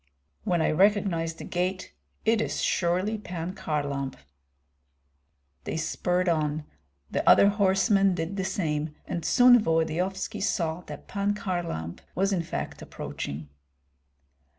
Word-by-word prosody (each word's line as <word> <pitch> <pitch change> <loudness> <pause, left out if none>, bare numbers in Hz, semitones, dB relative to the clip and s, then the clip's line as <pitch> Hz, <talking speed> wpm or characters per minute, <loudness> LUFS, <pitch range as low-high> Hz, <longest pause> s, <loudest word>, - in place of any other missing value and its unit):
"When 175 -3 +2
I - - +2
recognize 180 -2 +2
the - - -9
gait, 185 +1 -2 0.3
it 225 0 +3
is - - -2
surely 185 +5 +1
Pan 180 -2 -5
Kharlamp." 140 -5 -2 1.5
They - - -3
spurred 180 +3 0
on; 155 -2 0 0.5
the - - +2
other 200 - +7
horsemen 195 -1 +3
did 165 +3 -3
the 190 - -1
same, 155 -5 -2
and 170 - -4
soon 245 +4 +7
Volodyovski 165 +2 -1
saw 165 -3 0
that - - -9
Pan 200 +1 0
Kharlamp 175 - -3 0.2
was 195 +4 +1
in 180 - +1
fact 165 - -5
approaching. 75 +1 -6
180 Hz, 125 wpm, -27 LUFS, 160-195 Hz, 1.5 s, other